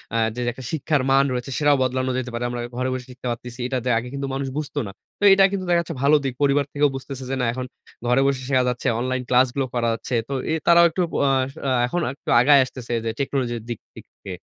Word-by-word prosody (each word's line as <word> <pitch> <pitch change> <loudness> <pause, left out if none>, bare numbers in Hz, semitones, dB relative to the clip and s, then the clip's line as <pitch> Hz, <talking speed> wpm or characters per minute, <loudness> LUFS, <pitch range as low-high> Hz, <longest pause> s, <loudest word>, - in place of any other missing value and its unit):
আ - - +2 0.2
যে - - -5
একটা 130 +2 -11
শিক্ষার 155 -2 0
মান 135 +1 +5
রয়েছে, 125 +2 -4
সেটাও 145 -1 +4
বদলানো 130 0 -1
যেতে 130 -1 -3
পারে। 120 +1 -3
আমরা 120 0 -4 0.2
ঘরে 130 +1 0
বসে 130 -1 -5
শিখতে 125 0 -8
পারতেছি। 120 +1 -7
এইটা 130 +1 -1
তে - - 0
আগে 115 - -3
কিন্তু 140 0 -3
মানুষ 135 0 -2
বুঝতো 150 -1 -3
না। - - -7 0.3
তো - - -5
এইটা 195 0 +6
কিন্তু 195 -2 -3
দেখা 175 -1 +4
যাচ্ছে 165 -1 -7
ভালো 145 +2 +5
দিক। 135 - -1
পরিবার 140 0 +3
থেকেও 145 0 +3
বুঝতেছে 135 0 -7
যে, 135 - -1
না - - +1
এখন 130 +1 -4 0.4
ঘরে 125 +2 +3
বসে 135 -2 0
শেখা 130 -1 +3
যাচ্ছে, 125 -1 -3
অনলাইন 130 +1 -1
ক্লাসগুলো 130 +1 +3
করা 120 -1 0
যাচ্ছে। 115 +2 -4
তো - - -3 0.2
এ - - +1
তারাও 170 0 +7
একটু 175 +3 -2 0.2
অ - - +3 0.2
আস 130 +1 -3 0.2
আ - - +1 0.2
এখন 175 - -2
একটু 140 - -16
আসলে - - +4
আগায় 140 +1 +6
আসতেছে 125 -2 -7
যে 115 - 0
টেকনোলজির 125 -4 -1
দিক 120 - -4 0.2
দিক - - -11 0.2
দিয়ে। 95 -2 -6
130 Hz, 250 wpm, -23 LUFS, 125-140 Hz, 0.4 s, তারাও